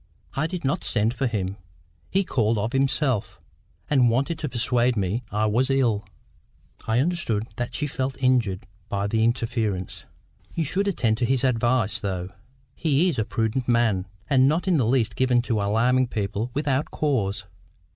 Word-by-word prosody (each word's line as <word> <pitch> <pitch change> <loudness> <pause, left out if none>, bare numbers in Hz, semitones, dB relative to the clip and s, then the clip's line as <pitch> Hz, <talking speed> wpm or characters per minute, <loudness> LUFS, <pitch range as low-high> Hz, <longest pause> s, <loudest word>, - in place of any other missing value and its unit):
I 155 +3 0
did 175 -3 -5
not 135 - 0
send 110 +1 +1
for 130 +1 -1
him. 100 -4 -3 0.5
He 195 +1 +2
called 115 - +1
of 105 +3 -1
himself, 135 -3 +1 0.5
and 130 -5 +4
wanted 140 +7 0
to 150 - -3
persuade 120 0 +1
me 100 +4 0
I 105 +1 +1
was 120 +5 +2
ill." 115 -7 +1 0.8
I 110 +1 +2
understood 135 -8 0
that 120 0 -3
she 150 - 0
felt 135 -2 -3
injured 120 -6 +1 0.2
by 100 0 -1
his 100 - -3
interference. 115 -5 -1 0.5
"You 165 - +1
should 190 +7 0
attend 115 - +1
to 125 - +2
his 130 +1 +2
advice, 120 -3 +1
though. 95 -3 -3 0.4
He 160 +2 +2
is 145 - -2
a 110 - +1
prudent 115 +3 -1
man, 115 -6 +2 0.2
and 130 -2 +4
not 165 +6 +1
in 180 -3 +3
the 125 -6 +2
least 120 -3 +1
given 130 -1 +3
to 115 -4 0
alarming 120 +5 +2
people 105 +1 -2
without 145 -1 0
cause." 105 -9 -1
120 Hz, 165 wpm, -24 LUFS, 110-135 Hz, 0.8 s, and